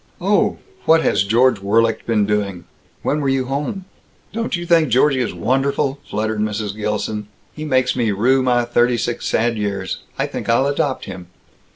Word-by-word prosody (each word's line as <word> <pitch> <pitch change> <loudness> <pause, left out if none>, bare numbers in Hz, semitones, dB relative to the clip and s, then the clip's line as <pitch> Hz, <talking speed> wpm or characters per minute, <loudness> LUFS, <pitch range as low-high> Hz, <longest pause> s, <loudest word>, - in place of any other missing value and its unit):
Oh! - - +2 0.3
What 160 0 +5
had - - +2
George 110 +4 +3
Worlicht 115 +3 +1
been 110 -3 +2
doing, 100 -4 -2 0.4
when 150 - +1
you 135 -1 +1
were 125 - -9
home?" 145 +7 -3 0.5
"Don't 230 -2 -2
you 175 0 -4
think 165 -4 +4
Georgie 130 +3 +3
is 120 - -1
wonderful?" 135 +2 0
fluttered 110 +1 -2
Mrs. 105 -1 -2
Gilson. 105 0 -3 0.3
"He 155 - -6
makes 130 -3 +1
me 115 -3 +1
rue 125 +7 +3
my 120 -2 +2
thirty 120 0 +2
six 120 +1 -2
sad 115 0 +1
years. 100 -2 -3 0.2
I - - +1
think - - -5
I'll 120 +3 +3
adopt 140 -1 -1
him. 90 -2 -8
120 Hz, 175 wpm, -19 LUFS, 105-135 Hz, 0.5 s, What